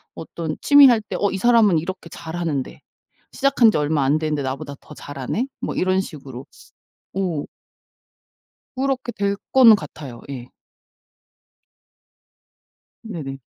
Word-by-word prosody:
어떤 165 -1 -6
취미 285 -1 +8
할 240 -3 +5
때 210 - -7
'어 200 - +1
이 195 - -3
사람은 220 -6 +4
이렇게 170 +1 -7
잘하는데 160 -5 -4 0.5
시작한 270 -5 +4
지 - - -1
얼마 150 -1 +1
안 140 +3 +2
됐는데 155 -2 -1
나보다 135 +2 -5
더 - - -13
잘하네.' 145 - -4
뭐 - - -3
이런 185 +1 +1
식으로. 135 -8 -9 0.7
오. 180 -6 -2 1.3
그렇게 260 -2 -1
될 200 0 -1 0.2
거는 245 -4 +8
같아요. 140 - -9
예. 125 -3 -7 2.6
네네. 155 -11 -6
170 Hz, 240 characters per minute, -21 LUFS, 145-215 Hz, 2.6 s, 취미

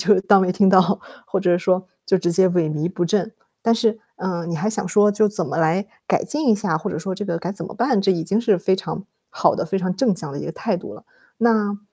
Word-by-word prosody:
就 205 +2 +4
当 200 0 +5
没 180 - +1
听 195 +1 +3
到， 190 +1 +4 0.3
或 195 - -1
者 180 -2 +2
说 185 0 0 0.2
就 190 - +3
直 175 -1 0
接 185 +2 +4
萎 175 -3 +1
靡 155 +3 -2
不 175 -1 -2
振。 200 +4 0 0.3
但 230 - +3
是， 225 -1 0 0.2
啊， 180 -2 -3
你 170 -1 -3
还 200 +7 -1
想 205 -3 -1
说 205 +1 +4
就 215 0 +3
怎 195 -4 -3
么 - - -4
来 165 +5 +1 0.2
改 - - +1
进 295 -3 -1
一 220 - +6
下， 205 -6 -1
或 - - -4
者 - - -4
说 185 +3 -4
这 205 - -5
个 170 -4 -2
该 175 +2 -4
怎 170 -4 -5
么 200 - -8
办？ 240 -3 +1
这 195 0 +2
已 170 -4 0
经 200 +6 +1
是 220 -6 +2
非 190 +1 +1
常 190 0 -5 0.2
好 - - +2
的、 - - -2
非 195 +3 -1
常 185 0 -2
正 210 -1 +1
向 155 -4 -5
的 140 - -6
一 - - -6
个 - - -3
态 - - -2
度 - - -9
了。 - - -15 0.3
那 215 -3 +2
190 Hz, 290 characters per minute, -21 LUFS, 175-210 Hz, 0.3 s, 一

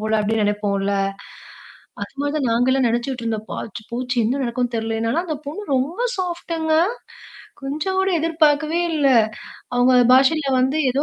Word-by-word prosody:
போல 215 0 0
அப்படின்னு 215 +1 0
நினைப்போம்ல? 200 -1 0 1.1
அது - - -7
மாதிரி 290 +1 -1
நாங்களும் 250 +3 +2
நினைச்சுட்டு 240 +2 -2
இருந்தோம். 220 -1 -3
ஆச்சி 220 0 -8
போச்சு 250 +1 -3
என்ன 255 +6 0
நடக்கும்னு 245 0 -2
தெரியல. 225 0 -2
என்னன்னா 230 +9 0
அந்த 310 -3 -3
பொண்ணு 310 +9 -5
ரொம்ப 290 - -2 0.2
சாஃப்ட்ங்க. 340 -3 -2 0.9
கொஞ்சம் 300 +8 -2
கூட 380 0 +2
எதிர்பார்க்கவே 310 0 +2
இல்லை. 280 -4 +3 0.6
அவங்க 245 +1 +4 0.2
பாஷையில 275 +3 +4
வந்து 265 +3 +1
ஏதோ 275 +3 0
260 Hz, 140 wpm, -21 LUFS, 230-310 Hz, 1.1 s, அவங்க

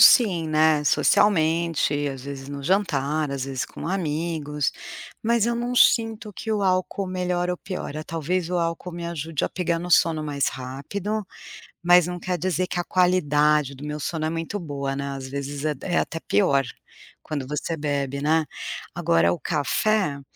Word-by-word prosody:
sim, 180 - +6
né, 155 -1 +4
socialmente, 165 -6 +3
às 135 -2 -6
vezes 140 -1 -7
no 140 0 -6
jantar, 155 -4 +1
às 135 -2 -2
vezes 135 -2 -3
com - - -8
amigos, 155 -4 -1 0.5
mas 235 0 +2
eu 235 - +1
não 240 +1 -2
sinto 225 -3 +3
que 225 +3 -6
o 210 -2 +1
álcool 185 +1 0
melhora 180 -1 -1
ou 180 - -3
piora. 180 -6 -5
Talvez 165 +2 -2
o 180 - +1
álcool 170 +1 -2
me 170 0 -5
ajude 160 -2 -2
a - - 0
pegar 170 -2 -1
no 175 +1 -6
sono 160 -2 +4
mais 145 -2 0
rápido, 160 +12 -4 0.6
mas 175 0 +6
não 180 0 -4
quer 180 +1 -2
dizer 185 +1 0
que 180 - -3
a 175 - 0
qualidade 150 -6 +3
do 135 +2 -10
meu 150 0 -4
sono 160 +1 -2
é - - 0
muito 165 +5 -3
boa, 140 -4 -3
né, 140 0 -3
às 135 -1 -6
vezes 140 +1 -4
é 155 -1 +1
é 175 - 0
até 165 - -1
pior 135 +6 +2 0.6
quando 145 -4 -4
você 150 +3 -2
bebe, 140 -2 -2
né. 155 +2 +2 0.5
Agora 85 +1 +3
o - - -4
café 155 +1 +1
160 Hz, 175 wpm, -24 LUFS, 145-180 Hz, 0.6 s, sim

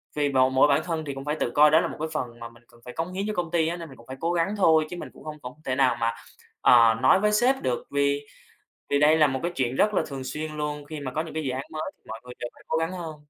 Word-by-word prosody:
tùy 145 -1 +1
vào 130 -1 +3
mỗi 130 +2 +5
bản 145 +2 +3
thân 160 -3 -3
thì 140 - -4
cũng 135 0 -8
phải 150 +1 -1
tự - - 0
coi 150 +1 +7
đó 160 +2 +6
là - - -1
một - - -8
cái 160 - -2
phần 120 -6 -4
mà 115 0 -7
mình 115 0 -20
cần 120 0 -21
phải 125 - -8
cống 165 +3 -4
hiến 195 +2 -2
cho 215 - -2
công 170 -2 -2
ty 165 -2 +2
á, 170 - -2
nên 165 -2 -8
mình 135 - -13
cũng 115 - -17
phải 130 0 -8
cố 165 +3 0
gắng 175 +5 0
thôi, 160 -5 +4
chứ 175 - -6
mình - - -7
cũng - - -15
không 155 -1 -7
không 125 0 -7
thể 130 - -1
nào 130 -2 +3
mà, 115 0 +1 0.5
ờ, 115 -2 +6
nói 130 +8 +5
với 210 +1 +2
sếp 250 +5 +2
được, 125 -2 -2
vì 140 0 +1 0.7
vì 140 - +3
đây 155 +2 +5
là 150 - +6
một 135 -2 -2
cái 175 - -1
chuyện 130 -1 -1
rất 210 +6 +3
là - - +2
thường 135 -2 -6
xuyên 155 +3 -4
luôn, 150 -1 -3
khi 155 -1 -7
mà 130 -2 -4
có 155 - -1
những 165 - -9
cái 160 - -2
dự 135 - -1
án 130 +2 -4
mới 155 - -3
thì - - -46
mọi 115 0 -7
người 125 0 -10
đều 120 - -4
phải - - -19
cố 160 - +1
gắng 165 +3 -1
hơn. 170 -4 -6
150 Hz, 330 wpm, -26 LUFS, 130-165 Hz, 0.7 s, coi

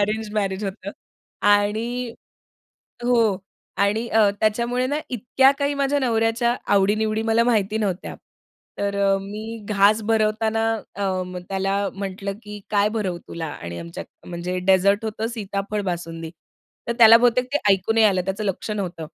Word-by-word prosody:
Arranged 215 +1 -1
marriage 200 -1 -1
होतं. 195 0 -5 0.5
आणि 220 +4 +1 0.9
हो. 245 0 +3 0.6
आणि 210 +4 +1
अ, 220 -3 +4
त्याच्यामुळे 235 +4 +1
ना, 290 +3 -1
इतक्या 255 +3 +3
काही 285 0 0
माझ्या 280 0 +1
नवऱ्याच्या 235 0 +1 0.2
आवडी-निवडी 215 +2 +2
मला 230 +1 +3
माहिती 220 -3 +1
नव्हत्या. 195 -4 -3 0.6
तर 200 0 -1
अ, 195 0 +3
मी 215 +3 -7
घास 210 +1 +4
भरवताना 220 0 +1 0.3
अं, 185 -2 -2
त्याला 195 0 -1 0.2
म्हटलं, 195 0 -4
की 210 0 -9
काय 205 0 +3
भरवू 210 -5 -2
तुला 165 -1 -5
आणि 85 - -7
आमच्यात 85 0 -10
म्हणजे 180 +1 -3
डेझर्ट 200 +3 +3
होतं 220 0 -3
सीताफळ 205 -2 -3
बासुंदी. 165 -2 -6 0.6
तर - - +2
त्याला 225 -1 +9
बहुतेक 245 +1 +3
ते - - +4
ऐकू 195 +3 0
नाही 225 -1 +5
आलं, 190 -3 +2
त्याचं 195 +3 -3
लक्ष 195 +2 -3
नव्हतं. 180 -6 -4
210 Hz, 145 wpm, -23 LUFS, 195-225 Hz, 0.9 s, त्याला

